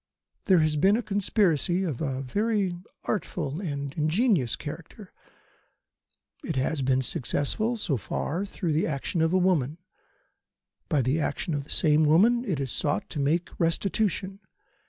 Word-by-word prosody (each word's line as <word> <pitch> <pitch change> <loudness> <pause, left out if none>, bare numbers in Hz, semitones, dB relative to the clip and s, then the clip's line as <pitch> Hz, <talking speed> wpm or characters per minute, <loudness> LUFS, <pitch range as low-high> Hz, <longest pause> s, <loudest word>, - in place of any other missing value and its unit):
There 185 -6 +5
has 155 -1 +1
been 195 +8 +4
a 240 - -2
conspiracy 195 -3 +1
of 155 -8 -3
a 135 -3 -2
very 200 - 0 0.3
artful 160 -6 -3
and 140 -7 -4
ingenious 160 - +1
character. - - -9 1.3
It - - -3
has 135 +3 0
been 130 0 +2
successful 215 - -1
so 155 - -1
far 165 - -3
through 185 -5 -3
the 155 - +1
action 155 +2 -2
of 160 0 +2
a 185 - +3
woman. 165 -6 +1 1.1
By 145 -6 +2
the 135 +6 +1
action 165 +2 -2
of 140 -1 -2
the - - -20
same 155 -1 +3
woman 220 +11 +4
it 175 - -1
is 135 -3 -2
sought 175 +7 -1
to 150 - -4
make 160 +5 0
restitution. 195 +3 0
165 Hz, 150 wpm, -27 LUFS, 145-195 Hz, 1.3 s, There